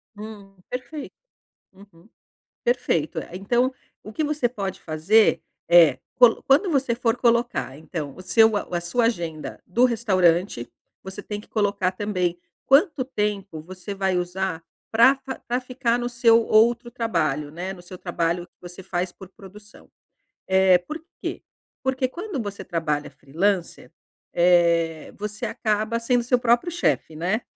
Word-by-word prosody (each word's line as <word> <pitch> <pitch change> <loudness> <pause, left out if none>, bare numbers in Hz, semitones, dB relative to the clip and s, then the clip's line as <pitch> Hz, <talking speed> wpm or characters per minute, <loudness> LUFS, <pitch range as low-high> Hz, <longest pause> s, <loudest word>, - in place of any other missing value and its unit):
Hum, 205 -2 -10
perfeito. 275 +4 -6 0.6
Uhum. 195 0 -19 0.6
Perfeito. 205 -10 0
Eh, - - -10
então 240 +7 +1 0.3
o 215 - -10
que 315 - -2
você 290 -5 0
pode 195 -5 -5
fazer 175 +8 +3 0.3
é 165 -7 +6 0.2
colo 240 -2 +5
quando 300 +8 +4
você 270 -5 +1
for 235 -1 0
colocar 235 - +1
então 155 -3 -6
o - - -11
seu 220 +3 +4
a 175 -3 -2
sua 230 +8 0
agenda 170 -9 -3
do 235 +7 +2
restaurante, 185 - +2 0.3
você 190 +2 -8
tem 210 0 -5
que - - -18
colocar 200 -3 0
também 185 -3 -2 0.3
quanto 285 -1 +4
tempo 205 - -3
você 185 +4 -8
vai 190 -2 0
usar 180 -1 -3 0.3
pra 235 +5 +6
fa 265 -1 -7
pra 245 +1 0
ficar 250 -2 -1
no 240 - -2
seu 235 -1 +4
outro 235 +2 +3
trabalho, 160 - -1
né, 180 +5 -5
no 185 - -12
seu 180 +1 -10
trabalho 175 -1 -2
que - - -44
você 175 +1 -10
faz 180 -1 -2
por 190 +1 -13
produção. 205 +1 -15 0.6
Eh, 190 -1 +5
por 310 - -8 0.2
quê? - - -5 0.4
Porque 265 0 0
quando 350 +1 -5
você 200 -3 -5
trabalha 150 -4 -2
freelancer, 175 +5 -2 0.4
eh, 170 -2 +2
você 210 0 -4
acaba 220 0 -1
sendo 240 +1 +1
seu 245 +1 +2
próprio 240 +7 +2
chefe, 335 - -1
né. 185 +9 -1
205 Hz, 150 wpm, -24 LUFS, 175-240 Hz, 0.6 s, é